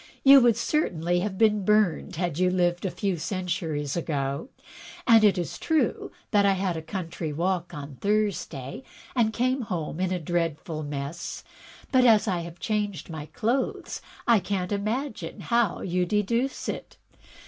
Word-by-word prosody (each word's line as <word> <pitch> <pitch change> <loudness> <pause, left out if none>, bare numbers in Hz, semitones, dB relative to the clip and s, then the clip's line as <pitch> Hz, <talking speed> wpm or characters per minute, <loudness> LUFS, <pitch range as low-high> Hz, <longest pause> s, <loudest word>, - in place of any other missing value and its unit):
You 275 0 +9
would 235 -3 +4
cer 305 +1 +1
tainly 175 +1 0
have 195 -1 -3
been 210 -2 +3
burned, 210 -4 +2
had 175 -1 -2
you 185 0 +4
Uved 175 0 +1
a - - +1
few 195 -1 -2
centuries 165 -5 -2
ago. 145 - -2 0.6
It 215 -4 +6
is 175 -2 -3
true 320 -2 0 0.2
that 205 -2 +4
I 200 -1 +4
had 190 -2 -1
a 160 - -4
country 165 -2 -4
walk 175 +2 -1
on 140 -2 -8
Thursday 200 - -1 0.3
and 230 -3 +3
came 255 +4 0
home 175 -7 -4
in 185 0 0
a 185 - +1
dreadful 165 -1 -2
mess; 145 +2 -5 0.5
but, 260 -2 +5
as 225 -2 +5
I 180 -3 +1
have 170 0 -7
changed 205 -4 -2
my 155 -2 -6
clothes, 245 - -2 0.3
I 235 -3 +6
can*t 190 -1 -2
imagine 220 +6 -3
how 235 -6 +1
you 180 0 0
deduce 230 +7 0
it. - - -5
185 Hz, 160 wpm, -26 LUFS, 165-215 Hz, 0.6 s, You